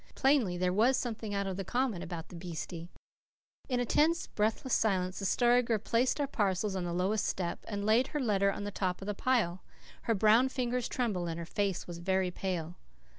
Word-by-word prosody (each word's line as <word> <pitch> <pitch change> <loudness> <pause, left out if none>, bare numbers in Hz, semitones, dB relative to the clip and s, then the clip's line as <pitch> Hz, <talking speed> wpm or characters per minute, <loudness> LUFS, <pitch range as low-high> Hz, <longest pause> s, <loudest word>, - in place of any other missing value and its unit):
Plainly, 265 -10 +3
there 180 0 +1
was 240 +6 +4
something 225 -4 -3
out 200 0 0
of 190 -1 -3
the 195 - -3
common 240 -2 -1
about 170 -2 -6
the - - -10
beastie! 170 0 -6 0.8
In 250 -1 +1
a 245 - +1
tense, 320 +7 +2
breathless 220 +4 -1
silence 185 -4 +1
the 195 - -4
Story 245 +4 +4
Girl 230 -2 0
placed 235 +6 +1
our 290 - +2
parcels 200 -5 0
on 185 -2 -2
the 175 - -3
lowest 190 +4 0
step, 175 -2 -3
and 205 -2 -3
laid 230 +5 +4
her 300 - -3
letter 200 -6 +2
on 205 - -5
the 205 - -4
top 185 -1 -2
of - - -6
the 210 - -2
pile. 200 -6 +1 0.4
Her 230 - +2
brown 220 +5 +5
fingers 250 -2 -1
trembled 200 -9 -1
and 165 - -4
her 170 - -5
face 195 +1 -1
was 170 -1 -7
very 190 +1 0
pale. 175 -2 -4
205 Hz, 210 wpm, -31 LUFS, 180-240 Hz, 0.8 s, brown